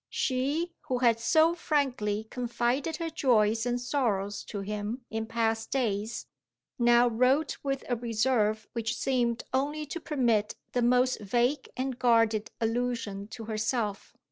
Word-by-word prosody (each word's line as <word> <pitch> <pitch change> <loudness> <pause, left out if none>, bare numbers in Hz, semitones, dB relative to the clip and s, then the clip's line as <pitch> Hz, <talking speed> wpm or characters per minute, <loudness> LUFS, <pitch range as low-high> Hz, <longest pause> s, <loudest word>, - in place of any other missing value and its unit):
She, 285 +7 -1
who 255 - 0
had 235 -2 +3
so 315 +8 +4
frankly 255 -11 0
confided 245 +5 -1
her 330 +1 -4
joys 225 -5 +2
and 245 0 0
sorrows 215 -6 -1
to 205 - -5
him 210 +4 -4
in 220 0 -3
past 225 -1 0
days, 220 -4 -1 0.5
now 240 0 +5
wrote 255 +6 +2
with 275 -1 -2
a 245 - +1
reserve 220 -2 0
which 230 0 -2
seemed 240 -3 0
only 295 +3 0
to 340 +4 -5
permit 235 -9 +1 0.2
the 245 - 0
most 250 +1 +3
vague 240 +7 0
and 260 -1 -2
guarded 230 -3 +3
allusion 225 -3 -2
to 225 +1 -8
herself. 215 -1 -2
240 Hz, 140 wpm, -29 LUFS, 220-260 Hz, 0.5 s, now